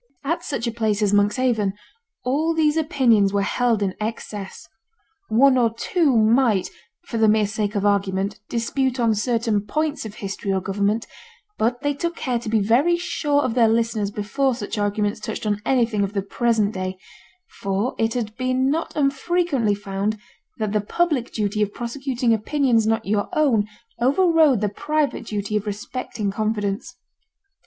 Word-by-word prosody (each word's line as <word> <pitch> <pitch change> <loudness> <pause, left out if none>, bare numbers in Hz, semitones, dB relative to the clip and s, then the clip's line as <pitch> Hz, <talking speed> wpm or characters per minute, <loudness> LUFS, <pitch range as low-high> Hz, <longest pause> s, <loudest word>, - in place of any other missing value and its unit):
At 325 +5 -1
such 265 -5 -3
a 235 - -1
place 220 -2 0
as 205 -1 +2
Monkshaven 210 0 +2 0.5
all 310 +6 +1
these 305 -1 +3
opinions 250 - +3
were 200 0 +2
held 230 0 +1
in 190 -2 -1
excess. 210 -4 -5 0.6
One 260 +3 +5
or 230 -2 +2
two 295 -1 +2
might, 220 -2 +3 0.3
for 230 - -3
the 220 - +5
mere 215 0 +4
sake 210 0 -2
of 200 0 0
argument, 200 0 0
dispute 255 +2 -1
on 230 -2 +3
certain 225 -1 0
points 305 +8 -2
of 215 -2 -8
history 195 0 -4
or 190 - +1
government; 200 +4 -1 0.5
but 240 +2 0
they 290 0 0
took 340 +4 -3
care 250 -6 -1
to 230 - -6
be 220 0 +2
very 265 +12 +3
sure 290 -4 0
of 245 - -1
their 235 -2 +4
listeners 225 -2 +1
before 235 +6 -1
such 215 -1 -5
arguments 205 +1 0
touched 220 0 -5
on 210 -1 0
anything 235 -5 +2
of 200 +1 -3
the 200 -2 -1
present 220 0 +1
day; 185 0 -4 0.6
for 200 +5 -1
it 225 +1 +1
had 220 -3 -3
been 255 +1 +1
not 325 +3 -2
unfrequently 280 - +1
found 200 +2 -2 0.4
that 215 -2 -2
the 210 0 +1
public 295 +2 0
duty 210 -1 -1
of 205 -1 -1
prosecuting 245 -1 -1
opinions 230 0 +2
not 225 0 +1
your 205 0 0
own 265 -10 +2 0.3
overrode 305 - +4
the 210 - +1
private 295 +2 -1
duty 210 0 -3
of 210 0 -1
respecting 210 0 -4
confidence. 210 +1 -2
225 Hz, 165 wpm, -22 LUFS, 205-260 Hz, 0.6 s, One